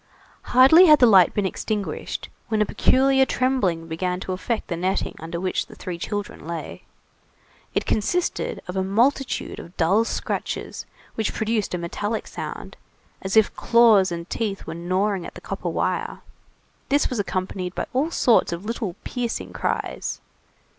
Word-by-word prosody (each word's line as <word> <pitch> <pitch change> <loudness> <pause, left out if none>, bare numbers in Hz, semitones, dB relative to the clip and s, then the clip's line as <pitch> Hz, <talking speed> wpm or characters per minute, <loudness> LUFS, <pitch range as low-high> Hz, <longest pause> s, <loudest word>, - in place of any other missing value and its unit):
Hardly 275 +9 +7
had 305 -1 +8
the 255 - +6
light 195 -6 +6
been 205 - +1
extinguished, 205 +2 -3 0.2
when 220 - 0
a 210 - +4
peculiar 265 +4 +3
trembling 250 -12 0
began 180 +2 -2
to 185 - -4
affect 215 +5 -2
the 170 - -2
netting 185 +3 -1
under 165 +1 -5
which 185 +1 -1
the - - -13
three 175 -2 -6
children 205 -4 -5
lay. 170 -1 -6 0.9
It - - +1
consisted 345 +12 -1
of 180 - -5
a 190 - +1
multitude 240 +8 0
of 170 - -12
dull 190 +7 +3
scratches - - -4 0.3
which 220 -2 -2
produced 220 -3 -1
a - - -1
metallic 205 +6 -3
sound, - - -7 0.4
as 190 +3 -1
if 220 - +4
claws 225 -6 +5
and 170 0 -5
teeth 205 -3 -3
were - - -5
gnawing 185 +3 -1
at - - -9
the - - -8
copper - - -4
wire. - - -2 0.7
This 285 +1 +3
was 245 - -2
accompanied 185 -2 -3
by - - -2
all 275 +5 +1
sorts 245 - +3
of 170 +3 -5
little 220 -5 -3
piercing 245 -2 -4
cries. - - -3
205 Hz, 160 wpm, -23 LUFS, 180-235 Hz, 0.9 s, had